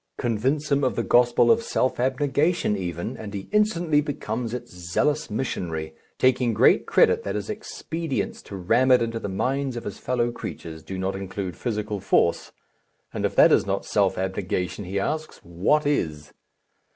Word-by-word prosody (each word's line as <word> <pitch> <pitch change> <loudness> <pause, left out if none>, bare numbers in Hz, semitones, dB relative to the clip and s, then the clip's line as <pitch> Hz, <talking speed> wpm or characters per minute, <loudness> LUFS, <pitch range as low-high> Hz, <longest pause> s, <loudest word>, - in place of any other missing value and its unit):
Convince 130 +6 -1
him 140 0 +3
of 130 - +1
the - - 0
gospel 120 - +4
of 230 0 +4
self 130 - 0
abnegation 140 +1 +1
even, 85 -3 -4
and 105 -2 -7
he 95 - -6
instantly 175 -8 +2
becomes 120 -5 -4
its 120 -3 -6
zealous 90 - -1
missionary, 85 -9 -3 0.2
taking 125 -3 +2
great - - +4
credit - - +4
that - - -4
his 105 - -3
expedients 165 -7 -4
to 100 - -9
ram 115 +8 +2
it 125 -2 +6
into 115 0 -3
the 100 - -5
minds 130 +6 -1
of 120 - -5
his 100 - -6
fellow 120 -1 0
creatures 80 -8 -7
do 95 +3 -7
not 95 +1 -2
include 95 -2 -5
physical 105 -1 -3
force - - +1 0.6
and - - 0
if - - -10
that - - +7
is - - +3
not - - -1
self 100 -2 +1
abnegation, 95 0 -2
he 95 +2 -2
asks, 155 +9 -3
what 95 - +1
is? 80 - -1
115 Hz, 170 wpm, -24 LUFS, 95-140 Hz, 0.6 s, that